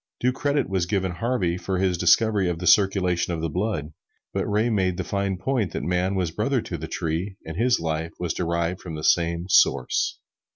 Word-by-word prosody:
Due 125 - +2
credit 145 +1 0
was 95 -3 -1
given 95 -2 0
Harvey 95 -4 -1
for 95 +1 -2
his 95 -1 +1
discovery 95 +2 +3
of 85 - -2
the 90 - -5
circulation 90 -3 +3
of 80 - -5
the 80 -1 -2
blood; 90 -6 -2 0.4
but - - -1
Ray 105 +3 +1
made 95 -6 +1
the - - -2
fine 100 -1 -2
point 110 - -1
that - - -3
man 90 +2 0
was 90 -4 -1
brother 120 +9 0
to 95 - -5
the 80 - -5
tree, 85 +5 -3
and 80 - -6
his 120 +5 +2
life 80 0 -3
was 85 -3 -2
derived 85 +1 -1
from 80 -3 -7
the 75 - -6
same 85 +1 +2
Source. 95 - +3
90 Hz, 205 wpm, -24 LUFS, 85-105 Hz, 0.4 s, discovery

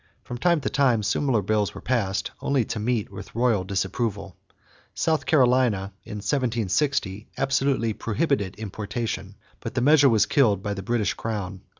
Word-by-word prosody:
From 120 -1 -7
time 170 0 +2
to - - -1
time 125 -6 +2
similar 120 -1 +1
bills 105 0 0
were - - -6
passed, 110 -6 -1
only 135 -5 +1
to 110 - -4
meet 110 -1 -1
with 100 +1 -10
royal 115 -5 +2
disapproval. 100 +1 -2 0.6
South 160 -3 0
Carolina, 125 - +3
in - - -8
1760, 115 -1 -1
absolutely 135 -4 +1
prohibited 105 - -1
importation; 110 +2 -5 0.2
but - - -7
the - - +1
measure 145 +1 +6
was 110 -3 +4
killed 105 -9 +2
by 100 - -2
the 95 - -5
British 115 +1 0
crown. 100 -4 -4
115 Hz, 155 wpm, -25 LUFS, 100-130 Hz, 0.6 s, measure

